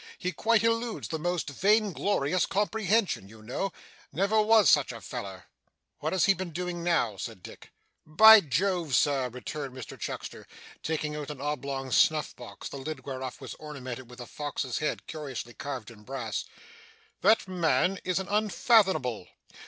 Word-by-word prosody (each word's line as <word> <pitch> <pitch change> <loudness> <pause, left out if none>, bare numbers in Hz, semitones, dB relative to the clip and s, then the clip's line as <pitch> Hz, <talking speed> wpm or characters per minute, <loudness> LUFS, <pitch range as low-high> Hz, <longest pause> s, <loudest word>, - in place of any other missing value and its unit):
He 180 - -2
quite 225 +6 +2
eludes 230 0 0
the 160 - -3
most 175 +1 -1
vigorous 195 - +1
comprehension, 205 - 0
you 110 0 -14
know. 130 - -3 0.4
Never 200 +5 +2
was 220 0 +5
such - - +4
a - - -8
feller!' - - -7 0.6
'What - - -2
has 190 - +3
he 195 - +5
been 185 -2 -5
doing 175 +1 -4
now?' 140 - +1
said 110 -2 -7
Dick. - - -12 0.3
'By 220 +8 +9
Jove, 165 -1 0
Sir,' 135 -2 +2
returned 135 +2 -6
Mr 130 - -8
Chuckster, - - -6 0.3
taking 155 -1 -2
out 150 -1 -5
an 150 -3 -7
oblong 140 -2 -3
snuff 155 +3 +3
box, 115 -5 -9
the - - -7
lid 135 -1 -6
whereof 130 -2 -5
was - - -7
ornamented 130 -5 -7
with 125 +1 -13
a 125 - -6
fox's 145 -2 -4
head 155 - -2
curiously 135 -6 -6
carved 130 -6 -6
in 110 -2 -15
brass, 115 -2 -4 0.8
'that 220 - +4
man 180 0 +1
is 185 - 0
an 190 0 -2
unfathomable. 195 - +2
155 Hz, 160 wpm, -28 LUFS, 130-195 Hz, 0.8 s, By